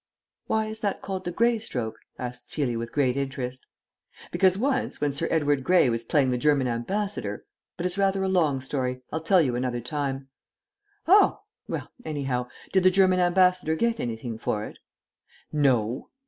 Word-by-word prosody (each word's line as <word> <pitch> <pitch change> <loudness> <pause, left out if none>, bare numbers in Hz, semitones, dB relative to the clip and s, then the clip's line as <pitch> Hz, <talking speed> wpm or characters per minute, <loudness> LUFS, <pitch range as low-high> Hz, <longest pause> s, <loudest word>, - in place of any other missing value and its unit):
"Why 220 0 +1
is 220 0 -6
that 205 -2 -2
called 190 -1 -4
the 175 - -2
grey 235 +5 +2
stroke?" 115 - -4 0.2
asked 125 -1 -7
Celia 125 -6 -1
with 115 0 -5
great 130 -4 +1
interest. 130 -2 -4 0.6
"Because 190 -1 +3
once, 265 +3 -1
when 145 -1 0
Sir 165 +4 -1
Edward 145 -4 +1
Grey 175 -6 +4
was 115 0 -2
playing 135 0 +2
the 125 - 0
German 145 -2 +3
Ambassador 195 - -3 0.3
but 175 - -3
it's 180 +2 -2
rather 195 -1 +2
a - - +1
long 160 -8 +2
story. 130 -1 -3
I'll 160 - -2
tell 175 +2 +4
you 125 -4 0
another 125 -1 -1
time." 135 +1 -3 0.8
"Oh! 395 +4 +5 0.3
Well, - - -5
anyhow, 135 -5 -2 0.3
did 190 - +5
the 185 - +6
German 185 -1 +4
Ambassador 180 -2 +3
get 230 +6 0
anything 115 -1 -4
for 105 -1 -2
it?" - - -11 0.7
"No." 125 -6 +1
145 Hz, 170 wpm, -26 LUFS, 125-185 Hz, 0.8 s, the